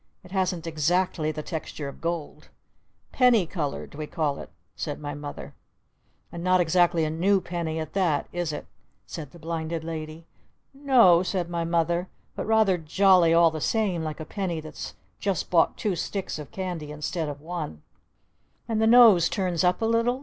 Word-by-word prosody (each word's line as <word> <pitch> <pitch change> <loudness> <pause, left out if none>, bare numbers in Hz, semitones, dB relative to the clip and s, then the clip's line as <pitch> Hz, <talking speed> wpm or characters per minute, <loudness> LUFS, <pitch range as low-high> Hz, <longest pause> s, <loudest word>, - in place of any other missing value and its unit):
"It 180 - -15
hasn't 185 -3 -1
exactly 165 0 0
the 155 0 -6
texture 155 -3 -5
of 140 - -10
gold." 170 -2 -4 0.6
"'Penny 245 -7 +4
colored' 155 -4 -4
we 150 +1 -6
call 150 -3 -1
it!" - - -9 0.3
said 145 -3 -4
my 145 -1 -5
Mother. 145 0 -8 0.8
"And 170 0 -6
not 185 0 +4
exactly 175 -1 +3
a 155 - -2
new 190 +5 +2
penny 170 -3 -4
at 155 -2 -5
that, 175 -7 +1
is 175 -2 -2
it?" 150 - -6 0.4
said 155 -5 -7
the 170 - -15
Blinded 165 0 -4
Lady. 160 0 -6 0.5
"N 280 +1 -13
o," 185 -10 +7
said 180 -2 -2
my 170 -1 -1
Mother. 170 +1 0 0.3
"But - - -4
rather 220 -5 +3
jolly 180 +1 +4
all 165 0 +5
the 155 -1 -5
same 195 -6 0
like 155 -1 -5
a 155 - -5
penny 180 -2 -3
that's 155 0 -8 0.2
just 195 -5 -2
bought 165 -2 +3
two 205 -4 -1
sticks 190 -2 -4
of 150 - -8
candy 180 -5 -5
instead 150 +2 -3
of 145 0 -7
one!" 155 - -6 0.8
"And 220 -1 0
the 220 - +4
nose 225 -7 +7
turns 185 -5 -1
up 180 +4 +2
a - - +3
little?" 230 +3 +1
170 Hz, 180 wpm, -26 LUFS, 155-185 Hz, 0.8 s, o